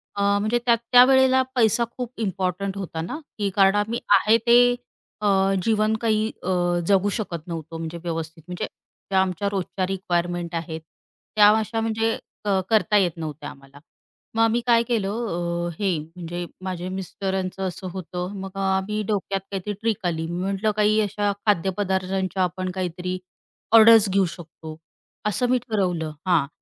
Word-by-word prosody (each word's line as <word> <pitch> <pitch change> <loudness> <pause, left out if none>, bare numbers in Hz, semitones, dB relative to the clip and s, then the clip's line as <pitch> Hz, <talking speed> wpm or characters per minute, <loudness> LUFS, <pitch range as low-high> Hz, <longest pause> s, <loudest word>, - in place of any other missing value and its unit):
अ, 200 - -2 0.2
म्हणजे 215 +3 +1
त्या 235 - +5
त्यावेळेला 260 +3 +5
पैसा 235 -1 +3
खूप 250 -2 -3
इम्पॉर्टंट 190 0 -2
होता 170 -4 -4
ना, 170 - -4 0.2
की 205 -2 0
कारण 195 0 +5
आम्ही 215 +3 0 0.2
आहे 215 +4 +4
ते 245 +1 +6 0.5
अ, 210 - +1 0.4
जीवन 215 0 +2
काही 220 -1 +1 0.2
अ, - - -6 0.4
जगू 200 0 +3
शकत 170 -7 -5
नव्हतो 165 -1 -6
म्हणजे 165 +1 -5
व्यवस्थित 165 -1 -5
म्हणजे 180 +4 -4 0.5
ज्या 190 0 +4
आमच्या 190 +2 -1
रोजच्या 190 -1 -2
रिक्वायरमेंट 175 -2 -2
आहेत, 165 -1 -4 0.5
त्या 210 -1 +7
अशा 225 +1 -2
म्हणजे 225 0 0 0.3
क 195 -2 +2
करता 215 -1 +3
येत 185 -4 +3
नव्हत्या 155 -2 -6
आम्हाला. 135 +1 -15 0.6
मग 225 - +2
आम्ही 230 +1 +2
काय 235 -1 +5
केलं 220 -5 -1
अ, 175 -6 -2
हे 195 -5 +1
म्हणजे 170 +2 -6 0.2
माझे 185 -1 -4
मिस्टरांचं 190 0 -3
असं 185 +1 -6
होतं. 180 +1 -5
मग 195 - -5
अ, - - -4 0.2
आम्ही 210 +3 -1
डोक्यात 195 -2 -1
त्यात - - -21 0.2
काहीतरी 210 - -2
ट्रिक 220 -5 -1
आली 165 -1 -2
मी 175 +1 -3
म्हटलं, 195 +3 0
"काही 215 +1 +3
अशा 205 0 0 0.2
खाद्यपदार्थांच्या 190 0 0
आपण 185 +1 -2
काहीतरी 180 0 -3 0.6
ऑर्डर्स 220 -2 +7
घेऊ 195 0 +3
शकतो." 160 -1 -10 0.5
असं 240 +5 0
मी 255 - +4
ठरवलं. 180 -8 -1 0.2
हां, 165 -6 +3
195 Hz, 160 wpm, -24 LUFS, 175-215 Hz, 0.6 s, त्या